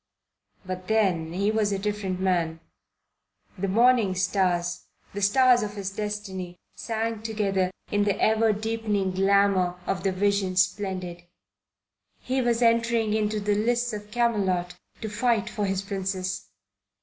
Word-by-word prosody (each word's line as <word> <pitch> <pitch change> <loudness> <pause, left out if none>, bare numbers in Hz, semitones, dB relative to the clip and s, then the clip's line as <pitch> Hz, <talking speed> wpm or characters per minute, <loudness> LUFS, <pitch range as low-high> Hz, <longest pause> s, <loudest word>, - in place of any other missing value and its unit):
But 185 0 -6
then 185 -7 +1
he 200 +4 +1
was 215 -2 +1
a 200 - 0
different 195 -2 -3
man. 170 -4 0 1.0
The 195 0 -2
morning 230 -1 +4
stars, 180 -2 0 0.3
the 205 - -4
stars 250 +4 +5
of 210 -1 -4
his 195 -1 -4
destiny, 195 -4 -5 0.2
sang 225 -1 -3
together 200 -4 0 0.2
in 205 0 +2
the 200 -2 0
ever 220 0 +3
deepening 210 -2 -1
glamour 190 -1 +2
of 195 -2 -1
the 195 0 +1
Vision 195 0 0
Splendid. 185 -2 -1 0.9
He 260 +1 -1
was 240 -1 +1
entering 230 -1 +2
into 215 0 0
the 205 0 0
lists 240 +3 0
of 210 0 -7
Camelot 195 -7 0 0.3
to 220 - -3
fight 220 +1 0
for 205 -2 -2
his 195 0 -1
Princess. 190 -2 -3
200 Hz, 135 wpm, -26 LUFS, 185-220 Hz, 1.0 s, stars